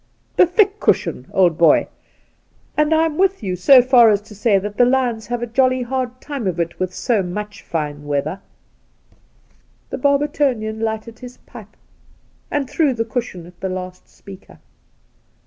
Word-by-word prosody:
The 365 - +5
thick 400 +3 +2
cushion, - - 0
old 175 -4 +2
boy, 165 -3 +4 0.9
and 300 +1 +1
I'm 320 0 +1
with 385 - +1
you 185 -2 -2
so 250 +8 +6
far 245 -3 +6
as 205 -2 +3
to 210 0 -15
say 210 0 +2
that 205 +2 -5
the - - +5
lions 245 -4 0
have 240 0 -3
a - - 0
jolly 255 +2 +1
hard 255 0 -4
time 275 -8 -5
of 175 -2 -2
it' 170 0 -3
with 185 -1 -2
so 220 +3 0
much 205 +3 -6
fiiie 150 -3 -4
#eather.' 145 +5 -3
The - - -38
Outspan - - -37
The - - -3
Barbertonian 275 -6 0
lighted 220 +1 -4
up - - -26
his 250 0 -10
pipe 215 -4 -13 0.7
and 290 -2 -2
threw 285 -2 +1
the 225 0 -2
cushion 225 -7 -5
at 175 +1 -17
the 190 - -3
last 185 0 -7
speaker. 195 -1 -14
225 Hz, 175 wpm, -19 LUFS, 190-260 Hz, 0.9 s, so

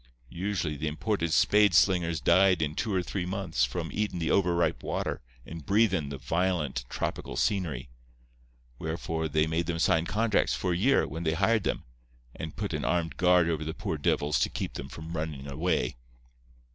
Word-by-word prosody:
Usually 85 -4 -2
the 80 +3 -3
imported 85 +2 -1
spade 105 +2 +4
slingers 85 -3 +3
died 95 -3 +4
in 75 -1 -2
two 110 +7 -2
or 95 -2 +1
three 90 0 -3
months 95 -10 0
from 80 +7 -4
eatin' 105 -3 -2
the 80 -2 -1
over 90 -3 +3
ripe 85 -6 +1
water - - -3 0.2
and 80 +2 -8
breathin' 95 -5 +2
the 70 - -5
violent 80 -5 -1
tropical - - -4
scenery. 90 -10 -1 0.9
Wherefore 80 0 -3
they 75 0 +2
made 80 +2 -1
them 85 -2 -1
sign 80 0 +2
contracts 105 +3 +1
for 90 -2 -1
a - - 0
year, 130 +10 +3
when 80 +4 -6
they 80 -1 +1
hired 110 +6 +2
them, - - -1 0.5
and 80 -1 -6
put - - -3
an - - -2
armed 85 -1 0
guard 90 -1 +4
over 80 -2 -1
the 80 +1 -4
poor 80 - -3
divils 75 +1 +1
to - - +2
keep - - -4
them - - -6
from 80 +1 -7
runnin' 75 -3 -4
away. 75 -1 -1
85 Hz, 185 wpm, -28 LUFS, 80-95 Hz, 0.9 s, spade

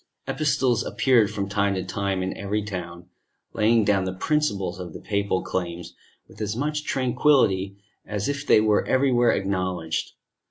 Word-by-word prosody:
Epistles 140 -6 +1
appeared 120 -6 +3
from 100 -2 -3
time 100 0 0
to 95 - -2
time 100 -2 -2
in 95 - -3
every 105 +1 -2
town, 90 -3 -7 0.5
laying 110 0 +3
down 100 -2 +2
the 95 - -2
principles 100 - -1
of 90 -3 -7
the - - -8
papal 100 -2 -1
claims 85 -1 -4 0.3
with - - -13
as 105 0 -2
much 150 +4 -2
tranquillity 120 -7 +2 0.3
as 105 -1 -3
if 145 0 -2
they - - +6
were 105 -1 +3
everywhere 125 -3 +3
acknowledged. 90 -4 -2
100 Hz, 155 wpm, -24 LUFS, 95-120 Hz, 0.5 s, they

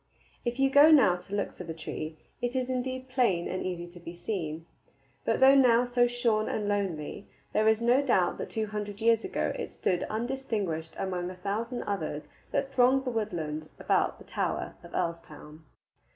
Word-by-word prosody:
If 240 0 -2
you 270 0 +3
go 285 +3 +8
now 265 - +6
to 195 +3 -6
look 200 - -2
for - - -7
the 165 -2 -6
tree, 155 0 -6 0.2
it 245 +1 -2
is 260 0 0
indeed 255 +1 -3
plain 240 -10 +1
and 185 - -3
easy 175 -2 -3
to 175 0 -13
be 170 0 -9
seen. 165 -4 -4 0.6
But - - +1
though 265 +1 +8
now 250 -3 +5
so 245 0 +3
shorn 235 -3 +1
and 210 -1 -2
lonely, 195 -3 -2 0.3
there 215 0 +3
is 220 +1 +3
no 245 +3 +5
doubt 195 -10 +2
that - - -4
two 220 -1 -1
hundred 210 -1 -5
years 225 0 +3
ago - - -1
it - - -5
stood 180 -1 -1
undistinguished 220 -8 -3
among 180 -2 -2
a 185 - -8
thousand 215 +6 -3
others 160 -7 -3 0.3
that 275 -1 -1
thronged 265 +1 +4
the 250 - -1
woodland 160 -9 -3
about - - +1
the - - -15
tower - - -2
of 170 - -12
Earlstoun. 160 -2 -5
215 Hz, 185 wpm, -29 LUFS, 175-245 Hz, 0.6 s, go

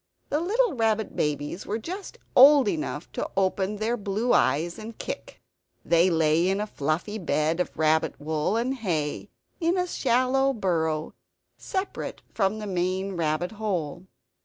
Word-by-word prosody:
The 295 - +1
little 450 +8 +1
rabbit 220 -3 0
babies 150 +4 -2
were 210 - -1
just 365 - -7 0.2
old 275 -1 +8
enough 160 -3 -3
to - - -3
open 195 +1 +1
their 220 +3 0
blue 215 +2 0
eyes 150 - +2
and 220 +1 -8
kick. - - -6 0.5
They 170 +2 +4
lay 165 +1 +3
in 195 +1 0
a 210 - -1
fluffy 175 +4 -2
bed 160 -2 0
of 180 - -2
rabbit 155 0 +2
wool 155 +7 -1
and 245 +3 0
hay, 170 - -2 0.3
in 340 +1 +1
a 360 - +1
shallow 265 -2 +2
burrow, 160 -7 -1 0.4
separate 380 +1 -4
from 195 +2 +1
the 215 - -5
main 185 0 -1
rabbit 160 +1 -1
hole. 185 -5 -3
195 Hz, 150 wpm, -26 LUFS, 160-230 Hz, 0.5 s, old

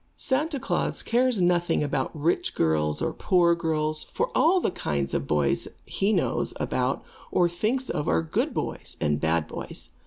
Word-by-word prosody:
Santa 290 +2 0
Klaas 270 - -1
cares 245 -2 +2
nothing 175 -3 +2
about 135 -2 -1
rich 165 +4 0
girls 75 -1 +1
or - - -1
poor 175 -2 +3
girls, 155 -2 -1
for - - -2
all 355 +4 +5
the 340 - 0
kinds 70 - -2
of - - -1
boys 75 -2 +1 0.2
he 195 +2 0
knows - - 0
about - - -1 0.3
or 175 - +3
thinks 220 +10 -1
of 150 - -2
are 80 -1 +2
good 80 - -1
boys - - -4
and 75 0 0
bad 80 -1 +1
boys. - - -6
170 Hz, 165 wpm, -26 LUFS, -, 0.3 s, all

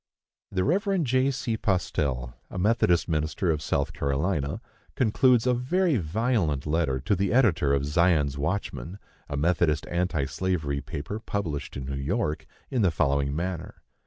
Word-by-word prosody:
The 95 -1 0
Rev. 195 - +1
J. 130 0 +2
C. 125 -4 -2
Postell, 70 - -1 0.2
a - - -7
Methodist 90 -3 +2
minister 80 +2 0
of 75 -2 -1
South 70 - -1
Carolina, 70 +1 -1 0.4
concludes 125 0 +3
a 125 - +3
very 155 +6 +1
violent 90 - 0
letter 75 -4 0
to 100 - +1
the 95 +1 0
editor 100 - +3
of 70 0 +1
Zion's 75 -2 +2
Watchman, 75 0 -3 0.3
a 70 - -3
Methodist 80 -1 +2
anti 85 -5 0
slavery 75 -6 -1
paper 70 - -5
published 95 -12 -4
in 65 - -5
New 70 - -4
York, 80 - -1 0.2
in 130 -4 +1
the 95 - +4
following 70 -3 +1
manner. 85 +1 -4
85 Hz, 150 wpm, -27 LUFS, 70-110 Hz, 0.4 s, the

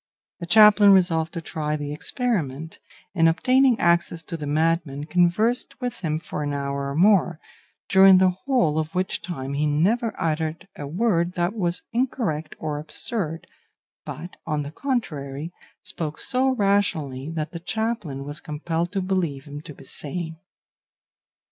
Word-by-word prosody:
The 170 - -6
chaplain 210 +1 +7
resolved 165 -4 +2
to 170 - -4
try 150 -1 -3
the 145 -1 -4
experiment, 160 - -2 0.3
and 165 -3 +4
obtaining 255 +7 +3
access 170 -1 +2
to 165 - -6
the 150 -3 -5
madman 155 -1 0
conversed 180 +10 +1
with 250 -2 -4
him 155 -3 -1
for 160 -2 -6
an 145 -1 -2
hour 140 0 -3
or 140 - -4
more, 180 -2 +4 0.5
during 190 0 +7
the 185 0 +4
whole 180 - +1
of 155 +2 -4
which 185 +1 -1
time 140 -7 -5
he 150 +2 +1
never 205 +11 +1
uttered 160 +2 -2
a 145 - -6
word 175 0 +1
that 175 +2 0
was 180 -5 -2
incoherent 225 - -1
or 150 -1 -3
absurd, 165 +2 -4 0.6
but, 175 - -8
on 150 -2 -1
the 145 - -7
contrary, 155 - -3 0.3
spoke 155 -2 -5
so 260 +1 +1
rationally 195 - 0
that 160 -1 -4
the 170 - -6
chaplain 210 - -3
was 145 +2 -6
compelled 165 +3 -3
to 195 -2 -1
believe 170 -8 -1
him 145 0 -8
to 150 - -10
be 135 - -15
sane. 160 +3 -4
165 Hz, 155 wpm, -24 LUFS, 150-195 Hz, 0.6 s, chaplain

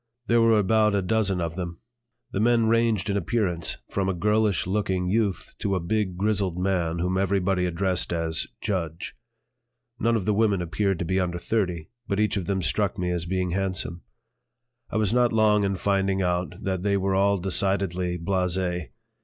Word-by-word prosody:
There 115 0 +3
were 115 -1 +5
about 105 +1 +3
a 100 - +1
dozen 100 -1 +1
of 85 -1 -3
them. 85 -2 -5 0.5
The - - -2
men 115 +1 +3
ranged 115 -3 +2
in 100 - 0
appearance 100 -4 -1
from 95 -1 0
a 95 - -1
girlish 105 +1 +1
looking 95 -1 -1
youth 100 -1 -1
to 100 -1 0
a - - 0
big 95 +1 -1
grizzled 100 -3 0
man 90 -3 0
whom 90 +2 0
everybody 95 -1 +1
addressed 90 +1 0
as 80 -1 0
"Judge." 85 -5 -3 0.9
None 115 0 +2
of 105 -5 -1
the 105 - +2
women 105 -2 +2
appeared 95 +2 -1
to 85 - -3
be 95 +3 0
under 90 -1 -1
thirty, 90 -4 -2 0.2
but 100 - -1
each 105 0 +1
of 95 -4 -3
them 95 -2 -1
struck 100 +3 0
me 90 -1 -1
as 85 -1 -2
being 90 0 -1
handsome. 95 -2 -2 0.9
I - - -2
was 110 -1 +1
not 125 -1 +3
long 105 -2 +3
in 100 -1 0
finding 95 0 0
out 90 0 -1
that 95 -2 -1
they 100 +1 +1
were 95 0 0
all 100 +1 +3
decidedly 95 -1 0
blasé. 90 -1 -1
95 Hz, 180 wpm, -25 LUFS, 90-105 Hz, 0.9 s, were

